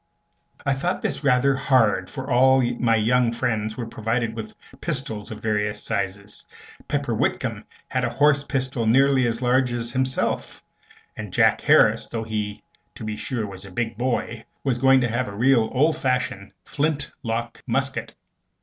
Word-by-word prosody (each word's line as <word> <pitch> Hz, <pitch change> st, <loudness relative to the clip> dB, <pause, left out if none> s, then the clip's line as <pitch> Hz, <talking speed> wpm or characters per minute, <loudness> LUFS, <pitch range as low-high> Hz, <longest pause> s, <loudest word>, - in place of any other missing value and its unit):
I 135 Hz, -, +2 dB
thought 175 Hz, +8 st, -2 dB
this -, -, -2 dB
rather 135 Hz, 0 st, +4 dB
hard, 120 Hz, -8 st, +2 dB
for 135 Hz, -2 st, -6 dB
all 130 Hz, 0 st, +4 dB, 0.2 s
my 115 Hz, -2 st, +3 dB
young 120 Hz, +2 st, +2 dB
friends 110 Hz, -3 st, -2 dB
were 120 Hz, -, -3 dB
provided 115 Hz, 0 st, -2 dB
with 110 Hz, -1 st, -7 dB, 0.3 s
pistols 110 Hz, -6 st, -3 dB
of 110 Hz, -, -8 dB
various 105 Hz, -1 st, -1 dB
sizes. 100 Hz, -1 st, -4 dB, 0.4 s
Pepper -, -, -1 dB
Whitcomb -, -, -1 dB, 0.2 s
had -, -, -1 dB
a -, -, +1 dB
horse 145 Hz, 0 st, +3 dB
pistol 130 Hz, -4 st, -2 dB
nearly 135 Hz, +1 st, +4 dB
as 115 Hz, +2 st, -2 dB
large 125 Hz, 0 st, +2 dB
as 120 Hz, -1 st, -3 dB
himself, 130 Hz, +1 st, -1 dB, 0.5 s
and -, -, -7 dB
Jack -, -, +3 dB
Harris, -, -, +4 dB
though 115 Hz, -1 st, -4 dB
he, 105 Hz, -2 st, -4 dB, 0.3 s
to -, -, -9 dB
be 110 Hz, 0 st, -3 dB
sure, 115 Hz, 0 st, -3 dB
was 95 Hz, -1 st, -9 dB
a 100 Hz, -, -10 dB
big 115 Hz, +4 st, -3 dB
boy, 120 Hz, -1 st, -2 dB, 0.2 s
was 130 Hz, -3 st, 0 dB
going 135 Hz, +1 st, +5 dB
to 120 Hz, -, +2 dB
have 120 Hz, +2 st, -1 dB
a 100 Hz, -, -7 dB
real 120 Hz, -2 st, +3 dB
oldfashioned 125 Hz, -8 st, 0 dB
flintlock 135 Hz, -6 st, -3 dB
musket. -, -, -1 dB
120 Hz, 160 wpm, -23 LUFS, 110-130 Hz, 0.5 s, going